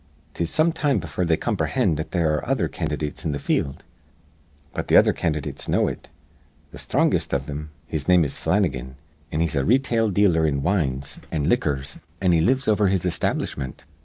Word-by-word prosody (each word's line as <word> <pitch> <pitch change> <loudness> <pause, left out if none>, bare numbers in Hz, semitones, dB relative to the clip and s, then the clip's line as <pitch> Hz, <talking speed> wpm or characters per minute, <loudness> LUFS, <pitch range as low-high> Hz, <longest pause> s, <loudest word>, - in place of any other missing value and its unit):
"'Tis 85 -1 -2
some 160 +1 +2
time 145 -6 +1
befure 80 +2 -3
they 80 -1 +3
comprehind 80 - 0
that 80 +2 -4
there 85 -4 +1
ar 75 - +1
re - - -9
other - - +1
candydates 75 0 -4
in 80 -4 -1
th' - - -4
field. 70 0 -1 0.9
But - - -3
th' - - -1
other - - +6
candydates 75 -4 -3
know - - +3
it. - - -6 0.6
Th' - - -8
sthrongest - - +1
iv 70 - -1
thim 75 +2 -6 0.2
his 80 -3 -4
name 90 -3 +5
is 70 - -4
Flannigan, 65 -11 0 0.4
an' 75 - 0
he's 85 -2 0
a 70 - +1
re 120 - +5
tail 115 -5 0
dealer 90 -5 +3
in 70 -2 -1
wines 70 -6 -1
an' 75 -3 -1
liquors, 70 - 0 0.2
an' 90 -2 +2
he 85 -2 +4
lives 130 +9 +2
over 105 -1 +3
his 95 -2 +1
establishment. 65 -6 -2
80 Hz, 190 wpm, -23 LUFS, 70-95 Hz, 0.9 s, other